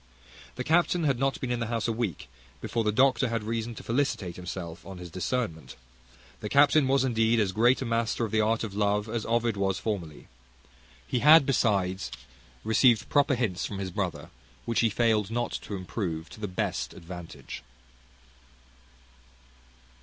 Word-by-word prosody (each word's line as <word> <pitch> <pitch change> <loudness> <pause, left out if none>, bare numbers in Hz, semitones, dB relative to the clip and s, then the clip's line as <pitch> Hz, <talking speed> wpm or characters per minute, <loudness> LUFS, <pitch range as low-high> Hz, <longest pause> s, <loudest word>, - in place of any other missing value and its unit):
The 125 - -3
captain 170 +3 +2
had 135 -5 +1
not 135 0 0
been 125 - -3
in 120 - -1
the 115 - -2
house 115 -1 -1
a - - +1
week 105 - -3 0.3
before 115 - -2
the 105 - +2
doctor 130 +2 +3
had 115 -2 -2
reason 115 +1 -3
to - - -9
felicitate 115 -8 -1
himself 90 -2 -7
on 95 -1 -9
his 90 -1 -9
discernment. 90 -2 -3 0.6
The 105 - -5
captain 140 +1 +5
was 135 0 +3
indeed 115 -2 +2
as 100 -3 +1
great 120 +6 +3
a - - -4
master 115 0 0
of 110 - -6
the 110 0 +3
art 110 +1 +1
of 110 -3 -5
love 105 +1 +1
as 115 0 -3
Ovid 115 -1 +1
was 95 -1 0
formerly. 90 -9 -4 0.8
He 125 - -1
had 150 +2 +8
besides 100 -8 +1 0.5
received 110 +1 +3
proper 140 -2 +3
hints 110 -7 -1
from 100 - -6
his 95 -1 -4
brother, - - -4 0.3
which 115 - 0
he 115 - +3
failed 110 -1 +1
not 120 +1 -2
to 105 - -6
improve 90 -3 -4
to - - -11
the 105 - -3
best 90 - -3
advantage. 85 0 -9
110 Hz, 170 wpm, -28 LUFS, 95-120 Hz, 0.8 s, had